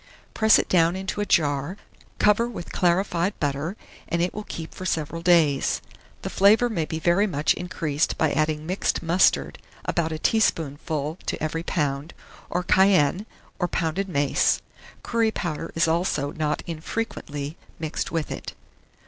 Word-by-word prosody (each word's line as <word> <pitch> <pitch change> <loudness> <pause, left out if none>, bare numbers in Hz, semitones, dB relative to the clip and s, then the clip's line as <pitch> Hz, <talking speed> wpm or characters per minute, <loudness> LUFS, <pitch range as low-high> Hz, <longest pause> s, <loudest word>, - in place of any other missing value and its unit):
Press 220 -1 +5
it - - 0
down 170 -1 +3
into 190 +2 -3
a 205 - -2
jar, 145 +3 +1 0.4
cover 210 +3 +3
with 205 -7 -7
clarified 180 +1 +1
butter, 145 +7 -2 0.3
and 170 - -1
it 175 +2 0
will 210 0 -6
keep 160 -1 -7
for - - -8
several 165 -2 -2
days. 165 -6 +3 0.4
The - - -3
flavour 215 +5 +5
may 170 -8 -1
be 160 - -4
very 175 +6 +3
much 150 -5 +1
increased 165 -4 -1
by 160 -2 +2
adding 155 0 0
mixed 185 0 -1
mustard 170 +3 +2 0.3
(about 165 -2 0
a 155 - -2
teaspoonful 155 -5 0
to - - -2
every 165 +1 -2
lb.), 145 -2 -2 0.4
or 180 +1 -1
cayenne, 190 0 +3 0.3
or 175 - +1
pounded 180 +4 -1
mace. 140 -4 +2 0.4
Curry 230 -1 +1
powder 165 -6 -4
is 165 - +3
also 160 -4 0
not 150 -1 -2
unfrequently 160 -4 -4 0.2
mixed 155 -1 -3
with 165 -2 -2
it. - - -6
165 Hz, 150 wpm, -25 LUFS, 155-190 Hz, 0.4 s, Press